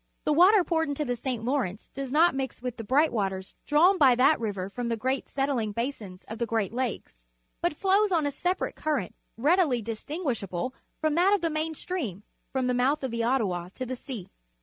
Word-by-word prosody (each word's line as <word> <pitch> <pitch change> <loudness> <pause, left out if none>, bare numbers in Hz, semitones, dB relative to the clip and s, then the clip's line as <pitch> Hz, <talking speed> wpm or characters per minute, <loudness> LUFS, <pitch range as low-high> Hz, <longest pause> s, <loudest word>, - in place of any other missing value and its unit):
The 300 - +2
water 370 +5 +6
poured 320 -3 0
into 285 +1 -2
the 245 - -1
St. 240 -2 -4
Lawrence 240 -7 -2
does 270 -1 -5
not 330 +5 +5
mix 270 -2 -3
with 250 -1 -5
the 225 - -5
bright 285 +8 +3
waters 190 -3 -2
drawn 345 +6 +5
by 265 -4 +6
that 265 +5 +4
river 200 -5 -3
from 235 +4 -4
the 230 - -1
great 260 +4 -1
settling 270 -6 -1
basins 215 -6 -4
of 220 +1 -7
the 235 - 0
Great 225 -2 -1
Lakes, 245 - -3 0.4
but 345 -2 0
flows 395 +4 +3
on 325 -4 +2
in - - +2
a - - -23
sepa 360 +1 -1
rate - - -2
current 290 - -2 0.2
readily 295 0 +3
distinguishable 230 - -3 0.3
from 310 -1 +1
that 365 +5 +4
of 400 - -3
the 330 -1 0
main 315 +1 -1
stream, 250 - -4 0.3
from 265 -1 0
the 250 - +1
mouth 270 +4 +1
of 260 - -2
the 230 0 -1
Ottawa 200 -8 0
to 255 - -4
the 255 +1 -4
sea. 240 -7 -8
260 Hz, 215 wpm, -27 LUFS, 225-310 Hz, 0.4 s, water